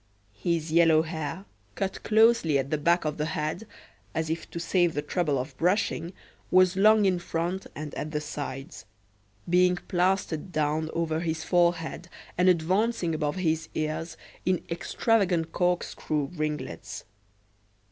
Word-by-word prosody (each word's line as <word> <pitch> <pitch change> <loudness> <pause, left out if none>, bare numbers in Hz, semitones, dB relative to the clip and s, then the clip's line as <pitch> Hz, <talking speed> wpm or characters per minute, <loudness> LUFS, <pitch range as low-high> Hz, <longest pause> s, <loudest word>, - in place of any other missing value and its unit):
His 165 +1 -1
yellow 160 -1 +5
hair, 165 +3 -5 0.3
cut 195 -1 -3
closely 220 -8 +4
at 135 0 -2
the 155 - +1
back 170 +2 +2
of 150 0 -2
the 150 - 0
head, 155 +8 -3 0.5
as 160 0 -1
if 165 - -4
to 170 - -6
save 175 0 +1
the 145 - -1
trouble 150 -2 0
of 130 +1 -4
brushing, 180 -1 0 0.4
was 185 0 +5
long 210 +2 +5
in 185 -2 +2
front 175 +2 -3
and 150 -1 -6
at 155 - -4
the 150 -1 -2
sides; 145 - -6 0.6
being 180 +1 +4
plastered 180 -1 -1
down 155 0 0
over 160 -1 0
his 160 -1 -2
forehead 170 -1 +1 0.3
and 180 +1 +4
advancing 185 +2 +1
above 150 -1 -1
his 160 -4 -1
ears 155 +2 -3 0.3
in 185 -1 0
extravagant 175 -2 +1
corkscrew 170 -5 -1
ringlets. 150 - -4
165 Hz, 140 wpm, -27 LUFS, 155-180 Hz, 0.6 s, yellow